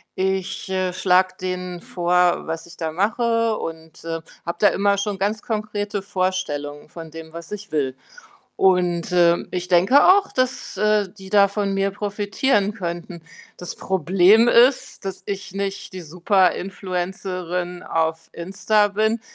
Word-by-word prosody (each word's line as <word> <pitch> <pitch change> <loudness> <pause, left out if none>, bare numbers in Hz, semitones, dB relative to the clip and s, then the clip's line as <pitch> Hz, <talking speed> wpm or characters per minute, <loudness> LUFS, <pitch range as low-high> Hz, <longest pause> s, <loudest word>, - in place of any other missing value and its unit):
ich, 190 0 -2
äh, 185 -1 -1
schlage 185 0 +2
denen 180 -1 -4
vor, 180 0 +1
was 165 0 -4
ich 170 -1 -13
da 160 -2 -3
mache 230 +5 +1
und, 160 0 -8
ähm, 165 0 -4 0.3
habe 170 - -3
da 205 - +7
immer 200 0 +1
schon 200 -1 -2
ganz 205 +2 -1
konkrete 210 -2 -3
Vorstellungen 185 -7 -3
von 165 -1 -10
dem, 160 0 -10
was 170 +1 -8
ich 210 -1 -7
will 135 -4 -1 0.6
und, 180 -2 +2
ähm, 175 -1 +3
ich 180 -1 -3
denke 185 +11 +5
auch, 400 0 +1
dass, 255 0 -1
äh, 210 -1 +2
die 195 -3 -12
da 200 0 +5
von 200 -1 -2
mir 195 0 +1
profitieren 205 +2 0
könnten. 170 -3 -6 0.4
Das 180 - -6
Problem 190 +5 +4
ist, 245 -2 +3
dass 190 -1 -5
ich 195 -1 -5
nicht 195 0 -4
die 185 - -7
Super-Influencerin 180 0 -1
auf 160 0 -2
Insta 195 +4 +1
bin. 220 +3 0
190 Hz, 145 wpm, -22 LUFS, 175-205 Hz, 0.6 s, da